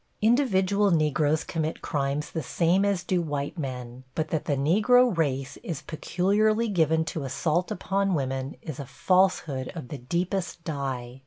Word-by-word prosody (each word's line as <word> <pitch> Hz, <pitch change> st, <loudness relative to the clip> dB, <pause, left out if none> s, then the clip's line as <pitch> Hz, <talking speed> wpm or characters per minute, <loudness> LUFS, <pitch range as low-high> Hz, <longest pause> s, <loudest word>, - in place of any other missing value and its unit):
Individual 205 Hz, -5 st, +3 dB
Negroes 155 Hz, -2 st, +2 dB
commit 160 Hz, -1 st, -3 dB
crimes 140 Hz, +1 st, -1 dB
the 160 Hz, -, -2 dB
same 170 Hz, +7 st, +2 dB
as 200 Hz, -3 st, +1 dB
do 180 Hz, -2 st, +1 dB
white 145 Hz, +1 st, -3 dB
men, 125 Hz, -3 st, -5 dB
but 155 Hz, 0 st, -1 dB
that 160 Hz, -, -2 dB
the 145 Hz, -, +1 dB
Negro 215 Hz, -, +4 dB
race 135 Hz, -5 st, -1 dB
is 165 Hz, -, -6 dB
peculiarly 210 Hz, +8 st, +1 dB
given 160 Hz, -4 st, +2 dB
to 160 Hz, -1 st, -4 dB
assault 155 Hz, +6 st, 0 dB
upon 195 Hz, 0 st, 0 dB
women, 135 Hz, -1 st, -2 dB
is 155 Hz, -4 st, -6 dB
a 140 Hz, -, -4 dB
falsehood 180 Hz, -9 st, +1 dB
of 155 Hz, -7 st, -7 dB
the 145 Hz, -, -6 dB
deepest 175 Hz, +5 st, -2 dB
dye. 135 Hz, -5 st, -4 dB
160 Hz, 155 wpm, -26 LUFS, 140-190 Hz, -, Negro